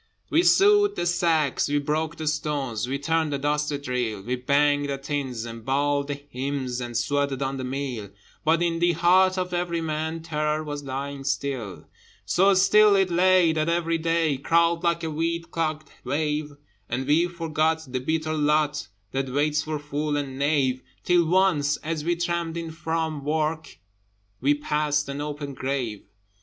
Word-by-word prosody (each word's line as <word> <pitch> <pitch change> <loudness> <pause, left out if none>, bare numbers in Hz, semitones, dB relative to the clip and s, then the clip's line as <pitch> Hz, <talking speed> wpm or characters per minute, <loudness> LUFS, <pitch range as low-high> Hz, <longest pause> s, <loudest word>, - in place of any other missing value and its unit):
We 325 - +5
sewed 410 +2 +5
the - - -2
sacks, 165 -5 +1
we 145 - +1
broke 155 +3 -1
the 160 - -6
stones, 145 -7 -1
We 135 +2 -1
turned 160 +1 0
the 140 - 0
dusty 150 +1 0
drill: 125 -7 -3
We 125 +4 -1
banged 145 +2 +2
the 140 - -1
tins, 135 -4 -3
and 115 -1 -8
bawled 140 +2 +1
the 145 - -2
hymns, 135 -2 -4
And 120 -1 -3
sweated 140 +2 0
on 135 0 -2
the 130 - -4
mill: 130 -5 -4 0.3
But 165 +2 +3
in 165 -1 0
the 175 0 +3
heart 185 +3 +4
of 180 -1 -2
every 175 -1 -1
man 160 0 -3
Terror 150 -1 -1
was 145 -1 -5
lying 140 +1 -5
still. 130 -8 -3 0.4
So 195 +2 +4
still 210 +2 +6
it 190 -2 +2
lay 180 -1 +4
that 155 +1 0
every 165 -1 0
day 165 -3 +1
Crawled 170 +4 +2
like 170 0 +1
a 160 - -2
weed 165 +2 -2
clogged 155 -2 -2
wave: 150 +2 -1 0.4
And 125 +3 -2
we 155 +5 +3
forgot 160 -2 -1
the 130 0 -3
bitter 155 +4 -1
lot 150 -3 +1 0.2
That 135 0 -2
waits 150 +3 +1
for 155 0 -3
fool 145 0 -2
and 135 -2 -4
knave, 140 -3 +1 0.2
Till 175 -1 +3
once, 165 -5 +2
as 155 -1 -3
we 175 +2 +1
tramped 170 -1 -2
in 165 -1 -5
from 160 -2 -3
work, 155 - -2 0.6
We 145 +3 +3
passed 150 0 0
an 140 +1 -4
open 145 -1 -5
grave. 130 -6 -3
150 Hz, 170 wpm, -25 LUFS, 140-165 Hz, 0.6 s, still